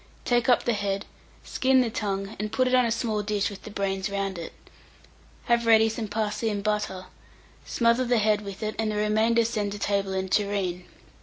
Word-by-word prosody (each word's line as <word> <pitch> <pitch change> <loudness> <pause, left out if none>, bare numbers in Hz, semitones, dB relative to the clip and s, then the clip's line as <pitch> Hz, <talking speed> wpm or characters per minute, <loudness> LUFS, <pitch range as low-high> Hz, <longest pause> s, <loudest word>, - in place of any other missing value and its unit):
Take 240 0 +2
up 245 - +4
the 240 - +1
head, 200 -1 -2 0.4
skin 260 0 +2
the 235 -3 -1
tongue, 195 -2 -3
and 210 0 -3
put 255 0 +2
it 255 - 0
on 250 -2 +5
a - - -1
small 225 -2 -1
dish 205 -1 -1
with 200 - -10
the - - -9
brains 195 -1 -2
round 195 -2 -3
it. 165 - -6 0.9
Have 235 -1 +2
ready 225 -1 +6
some 225 0 -4
parsley 215 +1 -1
and 205 -1 -3
butter, 210 -3 -2 0.6
smother 235 +1 +2
the 245 0 +2
head 210 -1 +2
with 200 +1 -7
it, 215 0 -2
and 220 -1 0
the - - -3
remainder 220 +2 +2
send 210 -3 -2
to - - -5
table 200 -1 -1
in 190 0 -1
a - - -9
tureen. 195 -3 -1
210 Hz, 210 wpm, -26 LUFS, 200-230 Hz, 0.9 s, ready